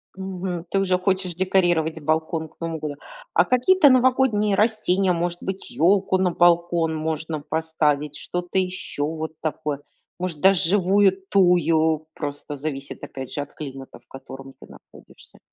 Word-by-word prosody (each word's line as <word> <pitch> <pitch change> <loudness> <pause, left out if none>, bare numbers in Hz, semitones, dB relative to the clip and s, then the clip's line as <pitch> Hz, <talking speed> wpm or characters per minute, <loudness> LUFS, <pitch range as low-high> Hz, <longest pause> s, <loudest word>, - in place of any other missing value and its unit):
Мгм. 185 -2 -5
Ты 195 - +1
уже 185 -2 +2
хочешь 185 -1 -1
декорировать 175 -4 +1
балкон 160 +1 -1
к - - -31
Новому 165 -1 -4
году? 150 -2 -5 0.4
А - - +4
какие-то 285 +5 +4
новогодние 255 -5 +3
растения, 195 -4 +2
может 175 0 -2
быть, 190 0 -5
ёлку 190 +3 +2
на 185 -1 +1
балкон 170 -1 +2
можно 155 0 -3
поставить, 150 -2 -1
что-то 175 +1 -4
ещё 180 -5 -3
вот 160 0 -5
такое? 150 -2 -3 0.4
Может, 175 -5 -4
даже 190 -3 +4
живую 195 0 +3
тую- 160 -4 +3
просто 145 0 -5
зависит, 140 -1 -6
опять 130 -2 -7
же, 145 - -2
от 145 - -9
климата, 135 -3 -9
в - - -34
котором 135 0 -11
ты - - -13
находишься. - - -17
170 Hz, 145 wpm, -23 LUFS, 155-190 Hz, 0.4 s, А